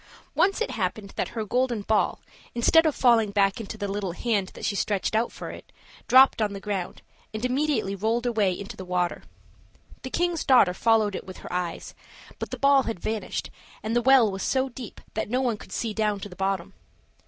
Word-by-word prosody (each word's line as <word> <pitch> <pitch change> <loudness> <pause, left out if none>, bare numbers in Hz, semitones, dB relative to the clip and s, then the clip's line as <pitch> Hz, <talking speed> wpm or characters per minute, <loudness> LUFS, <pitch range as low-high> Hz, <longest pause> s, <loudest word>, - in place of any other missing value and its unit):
Once 390 +3 +2
it - - -1
happened 200 0 -3
that - - -1
her 220 - -1
golden 245 -1 0
ball, 215 +1 +1 0.4
instead 325 +7 +5
of 305 - 0
falling 235 -4 +4
back 200 +1 +1
into 220 0 -7
the 205 -1 -3
little 195 -3 -3
hand 205 -1 0
that - - -6
she 200 - 0
stretched 200 0 -1
out 225 +2 +1
for - - -7
it, - - -12 0.4
dropped 260 -2 +6
on 210 -1 0
the 200 - -6
ground, 195 -3 -4 0.3
and 215 +3 -2
immediately 265 -5 0
rolled 225 +5 0
away 220 -5 +2
into 200 +2 -6
the 190 - -8
water. 180 -1 -1 0.8
The 260 - -6
king's 345 +2 0
daughter 245 -9 +5
followed 220 0 +2
it - - -6
with 185 - -8
her - - -7
eyes, 180 -2 -3 0.5
but - - -4
the - - -5
ball 275 0 +5
had 225 - -4
vanished, 215 +3 -3 0.3
and 220 +2 -2
the 240 - +3
well 250 -4 +5
was 190 0 -5
so 265 +4 0
deep 245 -2 -9
that 220 - -3
no 250 +3 +1
one 245 -5 0
could - - -14
see 225 -2 -2
down 210 -2 0
to 205 - -6
the 180 - -11
bottom. 195 0 -2
215 Hz, 210 wpm, -26 LUFS, 195-245 Hz, 0.8 s, dropped